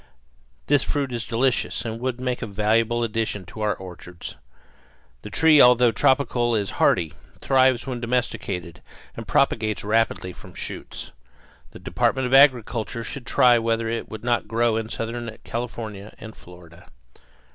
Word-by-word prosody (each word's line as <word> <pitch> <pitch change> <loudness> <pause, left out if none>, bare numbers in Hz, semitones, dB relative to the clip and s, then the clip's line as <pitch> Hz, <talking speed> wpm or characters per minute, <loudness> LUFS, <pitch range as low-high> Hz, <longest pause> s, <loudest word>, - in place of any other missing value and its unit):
This 145 - +3
fruit 140 +3 -2
is 120 -1 -4
delicious 125 +1 0
and 115 0 -4
would 125 0 -3
make 125 -1 -2
a 115 - -3
valuable 110 +3 +1
addition 110 -4 -2
to 95 +6 -10
our 105 -2 +1
orchards. 90 -1 -10 0.9
The 105 - -8
tree 155 +6 +5
although 125 -1 +6
tropical 120 -1 +2
is 100 -2 -1
hardy, 80 -4 +3 0.3
thrives 130 -2 +3
when 125 -2 -4
domesticated, 110 -8 -3 0.3
and - - -8
propagates 110 -2 +1
rapidly 105 -4 0
from - - -14
shoots. - - -6 0.6
The - - -12
Department 130 -1 0
of 125 - -2
Agriculture 120 -4 +3
should 120 +4 -7
try 120 -2 +5
whether 115 0 -1
it 115 0 -4
would 110 0 -8
not 120 -4 0
grow 115 +1 +1
in 110 0 -3
southern 115 0 -5
California 110 -4 -6
and 110 0 -10
Florida. 90 -1 -15
115 Hz, 145 wpm, -23 LUFS, 105-125 Hz, 0.9 s, although